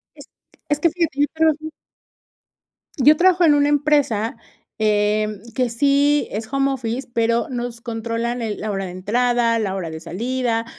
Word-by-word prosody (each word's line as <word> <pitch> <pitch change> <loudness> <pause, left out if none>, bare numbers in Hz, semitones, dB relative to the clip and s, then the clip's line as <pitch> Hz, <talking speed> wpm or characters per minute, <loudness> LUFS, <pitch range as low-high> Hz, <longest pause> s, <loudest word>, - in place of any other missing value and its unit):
Es - - -13 0.4
es 295 0 +1
que 335 - +3
fíjate 330 -4 -2
yo - - +5
trabajo. 315 -1 +1 1.3
Yo 290 +3 +6
trabajo 360 +1 +4
en 300 - +6
una 290 0 +3
empresa, 285 -6 +1 0.4
eh, 215 0 +1 0.3
que 250 -2 +1
sí 285 +4 +2
es 220 +2 -6
home 275 0 +1
office, 250 0 -4
pero, 230 0 +1
nos 240 -2 -4
controlan 230 +1 -3
el 220 -2 -3
la 215 - -4
hora 195 -1 -3
de 180 - -6
entrada, 230 +4 +1
la 195 -3 -2
hora 180 -4 -4
de 160 0 -7
salida, 230 +6 -2
240 Hz, 160 wpm, -21 LUFS, 220-285 Hz, 1.3 s, Yo